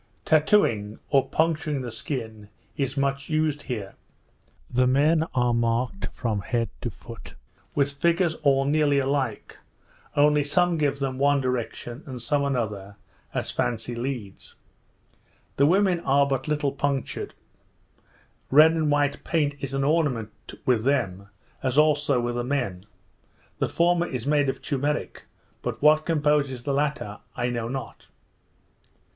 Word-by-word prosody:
Tattowing, 150 - +3
or 135 -2 +3
puncturing 155 -3 0
the 120 - -5
skin, 110 -3 -5 0.3
is 135 0 -2
much 140 0 -1
used 155 -2 0
here. 110 -9 -5 0.7
The 125 +1 +2
men 155 +5 +3
are 125 -1 +2
marked 120 +9 0
from 110 -5 -2
head 115 +4 -1
to 120 - -2
foot, 115 -1 -12 0.4
with 140 0 +2
figures 170 +3 +2
all 135 -2 +3
nearly 145 0 +2
alike; 135 -5 -2 0.6
only 150 0 +4
some 175 +4 +2
give 140 -2 +1
them 135 -2 -3
one 140 0 +3
direction, 125 0 -3
and 130 -2 -6
some 140 +5 0
another, 105 -7 -2 0.4
as - - -2
fancy 120 0 -2
leads. 120 -5 -5 1.0
The 140 - +5
women 185 0 +3
are 140 -2 +3
but 135 -1 -2
little 150 -2 0
punctured; 140 -1 -3 1.1
red 155 +4 +7
and 160 -2 0
white 145 -1 +1
paint 150 -4 +1
is 135 0 -4
an 135 - 0
ornament 140 -8 +1 0.3
with 120 -4 +2
them, 100 -8 0 0.3
as 130 0 -1
also 150 -3 +3
with 120 0 -1
the 120 0 -2
men; 120 -8 -2 0.7
the - - 0
former 175 0 +2
is 125 -3 -4
made 145 -1 +2
of - - -4
turmeric, 145 +1 -2 0.4
but - - -4
what 155 +1 +4
composes 145 -5 +1
the 140 - -1
latter 140 -7 -2 0.2
I 120 0 -1
know 115 -1 -2
not. 130 -1 -6
140 Hz, 140 wpm, -25 LUFS, 120-150 Hz, 1.1 s, red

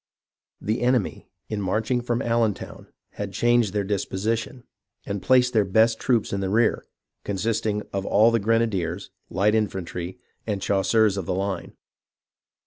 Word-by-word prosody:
The 110 +4 -2
enemy, 125 -4 0 0.2
in 110 -2 -3
marching 110 +6 0
from 120 0 -1
AUentown, 115 -3 -1 0.3
had 100 -1 -4
changed 120 -1 +3
their 100 0 0
disposition, 105 +5 -2 0.4
and 100 -1 -3
placed 125 -1 +4
their 110 -3 +4
best 110 +4 +3
troops 120 -6 +1
in 100 - -1
the 95 -1 -1
rear; 110 +3 +1 0.4
consisting 105 +1 -1
of 100 -1 -1
all 110 +4 +4
the 115 - +2
grenadiers, 100 -5 0 0.2
light 100 +4 +2
infantry, 95 -4 -2 0.3
and 105 -3 -1
chasseurs 100 +2 +2
of 95 -3 -4
the 90 - 0
line. 95 0 -3
105 Hz, 140 wpm, -24 LUFS, 95-115 Hz, 0.4 s, placed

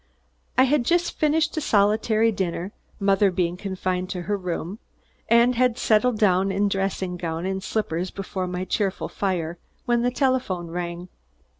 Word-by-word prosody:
I 260 - +7
had 265 0 +2
just 345 +6 0
finished 315 +1 +2
a - - +1
solitary 220 0 +3
dinner 185 -1 -3 0.3
mother 195 0 +3
being 175 -1 -1
confined 185 -1 -3
to 180 -2 -4
her 205 +3 -1
room 180 +1 -4 0.5
and 235 +2 +5
had 250 -1 +2
settled 225 +2 +2
down 195 -2 +3
in 200 +2 +1
dressing 195 -2 -2
gown 165 0 -3
and 190 0 -2
slippers 185 -4 -2
before 190 -1 -4
my 180 +1 -3
cheerful 195 0 -1
fire, 175 -4 -2 0.3
when 240 -2 +2
the 245 - +2
telephone 250 - 0
rang. 175 0 -4
195 Hz, 155 wpm, -24 LUFS, 180-230 Hz, 0.5 s, I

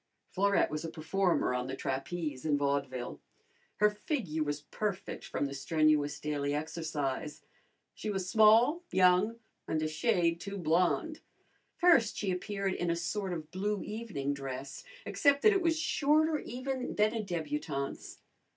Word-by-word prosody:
Florette 200 -2 +2
was 155 +1 -3
a 165 - -4
performer 175 -2 0
on 125 0 -2
the 130 - -4
trapeze 135 +1 -3
in 150 -2 +2
vaudeville. 140 -3 -2 0.5
Her 210 0 +4
figure 210 - -3
was 145 -1 -1
perfect 195 +5 -4
from - - -2
the 140 - -4
strenuous 150 0 +2
daily 145 -1 -1
exercise. 150 -2 -3 0.5
She 215 - -5
was 190 -3 -2
small, 225 - +5
young, 185 +4 +4 0.3
and 160 - 0
a - - +1
shade 170 0 +1
too 200 0 -5
blonde. 180 - +1 0.6
First 300 -12 +4
she 200 -3 -1
appeared 195 +1 -2
in 175 - -2
a 170 - +2
sort 190 +3 -2
of 160 -3 -5
blue 205 +2 -2
evening 210 -11 -3
dress, 135 -1 -6 0.2
except 285 -1 +2
that 430 - +7
it 390 - +2
was 330 -2 +2
shorter 310 0 +2
even 255 +1 -4
than 210 +1 +3
a 225 - -1
d 190 -4 -4
butante's. 150 -3 -4
175 Hz, 150 wpm, -31 LUFS, 150-215 Hz, 0.6 s, that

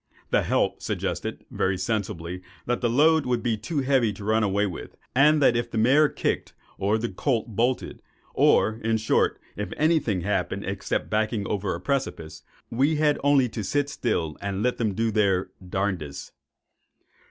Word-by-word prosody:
The - - +4
"help" - - 0
suggested - - -3
very 95 0 0
sensibly 90 -3 -3 0.2
that 120 0 -1
the 120 - +2
load 155 +5 +4
would 120 -2 0
be 120 -3 +1
too 140 +8 -3
heavy 130 -4 +2
to 100 - -10
run 110 +2 +2
away 100 0 +1
with, 90 -4 -7 0.2
and 150 +4 +5
that 120 - +5
if 120 0 -1
the 115 - -4
mare 140 +7 +5
kicked, - - -2 0.3
or 100 +3 +2
the 115 +2 -2
colt 115 +1 -2
bolted—or, 115 -2 0
in 110 0 +2
short, 110 - +1 0.2
if 105 - -4
any 160 +2 +3
thing 100 -10 -2
happened, - - -1
except - - -3
backing 110 -1 0
over 100 -2 -2
a - - -6
precipice, 85 - -3 0.3
we 140 +7 +2
had 150 -1 +2
only 140 -3 +4
to 110 - -5
sit 145 +8 0
still 80 - -2
and 100 0 -2
let 125 0 +1
them 110 -4 0
do 115 +1 0
their 100 -3 +1
"darndest." 90 -6 -3
110 Hz, 170 wpm, -25 LUFS, 100-130 Hz, 0.3 s, and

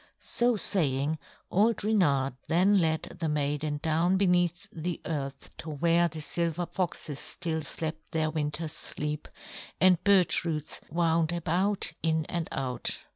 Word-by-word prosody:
So 240 0 +1
saying, 155 -7 +2 0.3
old 215 +3 +2
Reynard 145 -12 +2
then 190 +5 +4
led 160 -2 -1
the 165 -3 -1
maiden 145 0 -1
down 165 +3 +2
beneath 180 0 +2
the 170 +1 -3
earth 140 -4 -5
to 160 - -7
where 170 +3 +3
the 160 -1 -7
silver 170 +2 0
foxes 170 -6 -3
still 160 -2 -3
slept 155 +1 -5
their 160 -2 0
winter's 155 +1 -2
sleep, 150 0 -3 0.5
and 185 -2 +5
birch 195 -3 +4
roots 155 -3 -4
wound 165 0 +2
about 175 +3 0
in 160 -1 +1
and 170 -1 -3
out. 130 -3 -1
165 Hz, 135 wpm, -29 LUFS, 150-180 Hz, 0.5 s, and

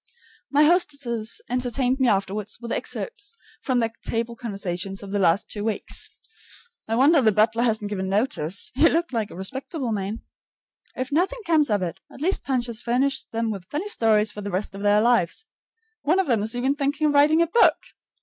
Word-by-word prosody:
My 290 +1 +4
hostesses 280 -9 +1
entertained 250 +1 0
me 260 - +3
afterward 200 0 0
with 235 -1 -7
excerpts 440 -1 -4 0.3
from 255 -2 0
their 230 -2 +1
table 230 +1 -2
conversations 195 -4 -4
of 195 - -8
the 205 - 0
last 185 0 +2
two 205 - -5
weeks. 220 -1 0 0.8
(I 225 - 0
wonder 285 +5 +5
the 220 -3 +4
butler 220 +3 +2
hasn't 220 -3 0
given 190 -2 -3
notice; 195 - 0
he 290 +6 +5
looked 335 -3 -1
like 220 -3 -1
a - - -11
respectable 260 - -4
man.) 205 +1 -3 0.7
If 255 +1 -4
nothing 380 +11 0
more 335 - +1
comes 300 -3 +4
of 205 -3 +1
it, 180 +2 -4
at - - -13
least 360 +7 0
Punch 255 -3 0
has 235 -1 -3
furnished 265 +3 0
them 230 0 -1
with 190 -3 -8
funny 340 +8 -3
stories 215 - +3
for 210 - -8
the 200 - -5
rest 195 +2 -3
of 195 - -8
their 205 +1 +4
lives. 235 - +1 0.6
One 325 +6 +2
of 385 - +2
them 235 -7 +1
is 220 +3 0
even 260 +3 +1
thinking 285 +2 -1
of 295 - +2
writing 305 +3 +5
a - - +1
book. 350 +8 +4
235 Hz, 200 wpm, -24 LUFS, 205-280 Hz, 0.8 s, wonder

